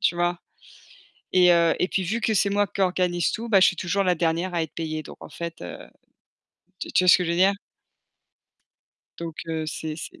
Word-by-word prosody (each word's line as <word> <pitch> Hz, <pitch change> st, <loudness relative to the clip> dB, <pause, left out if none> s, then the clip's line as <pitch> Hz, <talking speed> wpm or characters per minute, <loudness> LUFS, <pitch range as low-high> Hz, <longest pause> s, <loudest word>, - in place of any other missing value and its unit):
tu 175 Hz, -, +2 dB
vois 175 Hz, 0 st, 0 dB, 0.9 s
et 180 Hz, -1 st, +5 dB
heu 170 Hz, -1 st, +3 dB
et 180 Hz, -, +1 dB
puis 195 Hz, -, -1 dB
vu 220 Hz, +6 st, -2 dB
que 220 Hz, -, +1 dB
c'est 200 Hz, -1 st, +2 dB
moi 205 Hz, +1 st, +2 dB
qui 195 Hz, +1 st, -5 dB
organise 180 Hz, -2 st, +1 dB
tout, 230 Hz, +1 st, -5 dB
bah 200 Hz, -4 st, +5 dB
je -, -, +6 dB
suis 190 Hz, -, +1 dB
toujours 185 Hz, +3 st, -1 dB
la 180 Hz, -1 st, +2 dB
dernière 170 Hz, +2 st, -1 dB
à 165 Hz, -, +1 dB
être 160 Hz, -, -9 dB
payée. 155 Hz, -1 st, -4 dB
Donc -, -, -12 dB
en -, -, -11 dB
fait, 170 Hz, -1 st, -7 dB
heu, 90 Hz, -, -7 dB, 1.0 s
tu -, -, -6 dB
tu 185 Hz, -, +4 dB
vois 180 Hz, -, +4 dB
ce -, -, +8 dB
que 180 Hz, -, -2 dB
je 170 Hz, -, -1 dB
veux -, -, -1 dB
dire? 190 Hz, +3 st, +4 dB, 1.7 s
Donc 165 Hz, -2 st, -6 dB
heu, 160 Hz, -1 st, -3 dB
c'est 155 Hz, 0 st, -5 dB
c'est -, -, -9 dB
175 Hz, 225 wpm, -24 LUFS, 165-190 Hz, 1.7 s, ce